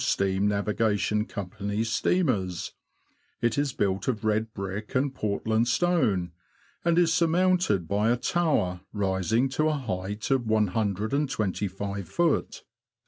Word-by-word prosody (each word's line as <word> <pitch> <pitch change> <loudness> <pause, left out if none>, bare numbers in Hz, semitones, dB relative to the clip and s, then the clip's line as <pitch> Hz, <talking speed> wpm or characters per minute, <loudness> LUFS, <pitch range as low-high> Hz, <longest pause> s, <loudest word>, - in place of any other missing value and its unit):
103 - - +2 0.2
Steam 95 +2 +1
Navigation 105 +1 +1
Company's 105 +3 -3
steamers. 100 - 0 0.7
It 120 -1 +1
is 145 -1 0
built 100 -6 -1
of 110 -4 -1
red 110 +1 +1
brick 100 +2 -6
and 135 +1 +1
Portland 110 0 0
stone, 115 - +1 0.5
and 170 0 +2
is 170 -2 +4
surmounted 170 - +2
by 105 +5 +1
a 120 - +3
tower 125 - 0
rising 105 +4 +1
to 155 +4 +1
a - - +1
height 105 -2 -4
of 135 -1 +3
125ft. 105 - -1
110 Hz, 120 wpm, -27 LUFS, 100-135 Hz, 0.7 s, is